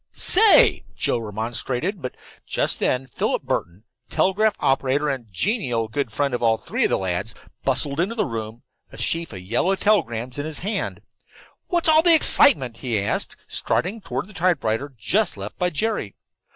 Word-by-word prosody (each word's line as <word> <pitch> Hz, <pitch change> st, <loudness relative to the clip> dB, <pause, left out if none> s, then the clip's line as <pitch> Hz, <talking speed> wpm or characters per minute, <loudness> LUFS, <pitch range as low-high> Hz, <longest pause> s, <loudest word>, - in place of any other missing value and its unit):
"Say!" 425 Hz, +2 st, +5 dB, 0.2 s
Joe 120 Hz, -, 0 dB
remonstrated. 120 Hz, -, -3 dB
But 125 Hz, -, -6 dB, 0.3 s
just -, -, -1 dB
then 130 Hz, +1 st, 0 dB
Philip 130 Hz, -, -2 dB
Burton, 90 Hz, +4 st, -4 dB, 0.3 s
telegraph 210 Hz, +3 st, +1 dB
operator 135 Hz, +2 st, +1 dB
and 125 Hz, -6 st, -5 dB
genial 120 Hz, -, -1 dB
good 130 Hz, +1 st, -3 dB
friend 140 Hz, +4 st, -1 dB
of 120 Hz, -, -2 dB
all 115 Hz, -1 st, +2 dB
three -, -, -1 dB
of -, -, +1 dB
the -, -, +1 dB
lads, 95 Hz, +3 st, -3 dB, 0.3 s
bustled 140 Hz, +2 st, +1 dB
into 195 Hz, +7 st, -1 dB
the 220 Hz, -, 0 dB
room, 110 Hz, 0 st, -6 dB, 0.3 s
a -, -, -12 dB
sheaf 165 Hz, 0 st, -2 dB
of 95 Hz, -4 st, -8 dB
yellow 120 Hz, -, 0 dB
telegrams 130 Hz, -, 0 dB
in 145 Hz, -, -3 dB
his 155 Hz, -, -5 dB
hand. 215 Hz, -, -3 dB, 0.7 s
"What's 345 Hz, -3 st, 0 dB
all 315 Hz, 0 st, +8 dB
the 340 Hz, 0 st, +8 dB
excitement?" 130 Hz, -, +5 dB
he 120 Hz, -5 st, -2 dB
asked, 100 Hz, -, -2 dB
striding 210 Hz, +5 st, -2 dB
toward -, -, -4 dB
the 210 Hz, -, -15 dB
typewriter 145 Hz, -, -1 dB
just 190 Hz, -, -1 dB
left 100 Hz, +2 st, -8 dB
by 180 Hz, -, +1 dB
Jerry. 205 Hz, -, -3 dB
135 Hz, 165 wpm, -22 LUFS, -, 0.7 s, all